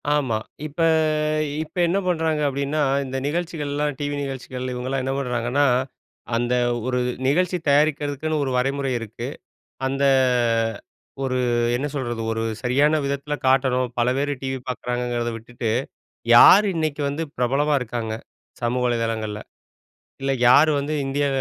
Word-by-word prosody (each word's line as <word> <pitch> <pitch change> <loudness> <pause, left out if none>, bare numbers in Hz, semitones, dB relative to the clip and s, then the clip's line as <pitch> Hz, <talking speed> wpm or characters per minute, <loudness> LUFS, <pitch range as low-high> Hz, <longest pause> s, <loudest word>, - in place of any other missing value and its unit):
ஆமா. 130 -7 0 0.3
இப்ப, 150 +2 -14 0.8
இப்ப 160 - -17
என்ன 185 +4 +1
பண்றாங்க 160 -3 0
அப்படின்னா, 140 +2 -1 0.2
இந்த 130 0 -4
நிகழ்ச்சிகள்லாம் 150 -3 -2
டிவி 145 0 -2
நிகழ்ச்சிகள் 130 -2 -5
இவங்கெல்லாம் 130 +2 -2
என்ன 135 +1 -1
பண்றாங்கன்னா, 125 +2 0 0.7
அந்த 120 +1 0 0.3
ஒரு 125 -1 0 0.3
நிகழ்ச்சி 180 +5 +2
தயாரிக்கிறதுக்குன்னு 150 +1 +1
ஒரு 135 - -2
வரைமுறை 135 +1 0
இருக்கு. 115 +2 -6 0.6
அந்த 135 +1 -1 1.2
ஒரு 130 -1 -1 0.4
என்ன 135 +4 -1
சொல்றது? 120 -4 -3
ஒரு 115 0 -2 0.2
சரியான 140 +6 +3
விதத்தில 140 +1 -3
காட்டணும். 130 -2 +2
பல 120 - +2
பேர் 145 +1 0
டிவி 130 0 -2
பார்க்குறாங்கங்கிறத 120 -1 -2
விட்டுட்டு, 115 0 -5 0.7
யார் 200 - +9
இன்னக்கு 155 -2 -1
வந்து 145 +4 -3
பிரபலமா 135 +5 +1
இருக்காங்க 115 -2 -3 0.5
சமூக 120 +1 0
வலதளங்கள்ல. 115 -3 -2 0.8
இல்ல 135 0 0 0.2
யார் 145 +5 +7
வந்து 145 +2 -3
இந்தியா 140 +1 0
135 Hz, 125 wpm, -23 LUFS, 125-145 Hz, 1.2 s, யார்